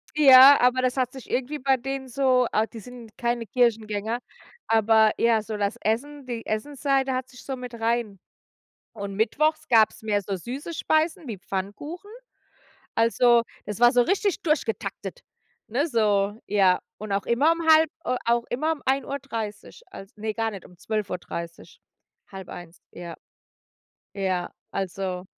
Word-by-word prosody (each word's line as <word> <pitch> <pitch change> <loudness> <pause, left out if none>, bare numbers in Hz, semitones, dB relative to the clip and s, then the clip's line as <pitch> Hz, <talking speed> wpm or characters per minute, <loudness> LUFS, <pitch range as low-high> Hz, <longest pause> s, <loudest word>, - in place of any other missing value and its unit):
Ja, 275 -1 +9
aber 250 +1 +3
das 255 +1 0
hat 255 -1 0
sich 265 -2 -11
irgendwie 265 +4 -2
bei 270 0 +2
denen 270 +1 -5
so 255 -1 +2
ah, 215 +1 +2
die 225 - -11
sind 240 -1 -13
keine 235 -1 -1
Kirchengänger, 220 -1 0 0.5
aber 220 -1 +4
ja, 230 -2 +3
so 215 0 -6
das 205 +2 -2
Essen 275 +6 -2
die 240 -2 -5
Essensseite 270 +3 -1
hat 255 0 -3
sich 250 -2 -14
so 270 - -3
mit 250 -1 -8
rein 225 -3 -1 0.7
Und 200 -2 -6
mittwochs 305 +9 +1
gab's 220 -2 +3
mehr 205 -2 0
so 195 0 -4
süße 265 - -6
Speisen 315 -1 0
wie 220 - -5
Pfannkuchen. 205 - -6 0.9
Also, 235 +1 +4 0.2
das 210 -1 -5
war 240 +1 +6
so 245 -1 +5
richtig 395 - 0
durch 310 -2 +1
getaktet, - - -5 0.5
ne, 260 +8 0
so 205 -6 +1
ja. 190 -3 +3 0.2
Und 210 -1 -6
auch 200 0 0
immer 280 +8 +3
um 335 - -3
halb 315 -1 +6
äh, 250 - 0
auch 235 0 +2
immer 305 +6 0
um 310 - -7
1:30, 265 -6 -3
als 195 +2 -12
ne, 215 0 -4
gar 225 0 -1
nicht, 195 -4 -9
um 180 - -19
12:30, 180 -5 -5 0.5
0:30, 175 -3 -10
ja. 170 -1 -8 1.0
Ja, 190 -3 -2 0.2
also 190 -1 -4
235 Hz, 155 wpm, -25 LUFS, 210-265 Hz, 1.0 s, Ja